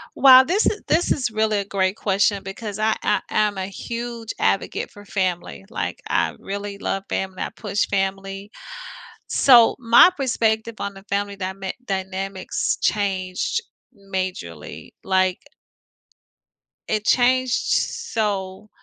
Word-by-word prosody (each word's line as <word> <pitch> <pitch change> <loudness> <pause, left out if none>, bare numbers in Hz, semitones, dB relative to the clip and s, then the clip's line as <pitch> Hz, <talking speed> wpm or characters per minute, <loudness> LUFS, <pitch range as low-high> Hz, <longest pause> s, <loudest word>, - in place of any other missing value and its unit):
Well, 260 -1 +9
this 370 +10 +1
is 425 - 0
this 335 +3 +2
is 255 -4 +1
really 215 -1 +1
a 200 - -3
great 190 0 0
question 200 0 +1
because 200 +1 -6
I 220 0 +2
I 210 - +2
I'm 210 -2 +1
a 190 - -3
huge 235 +2 -6
advocate - - 0
for 205 0 -14
family, 185 -1 -2
like, 235 - -4
I - - +1
really 200 0 -5
love 195 -1 -2
family, 190 -1 -3
I - - -3
push 205 -2 -2
family. 195 +1 -3 0.8
So 240 -4 +6
my 235 +7 +7
perspective 230 -4 0
on 200 - -3
the 195 0 -13
family 200 0 -1
dyma 190 0 -4
dynanamics 190 -1 -2
changed 195 - 0 0.4
majorly, 185 - -6
like 185 -1 +1 1.5
It 215 -1 -1
changed 255 +1 +3 0.4
so 210 - -3
200 Hz, 125 wpm, -22 LUFS, 190-225 Hz, 1.5 s, Well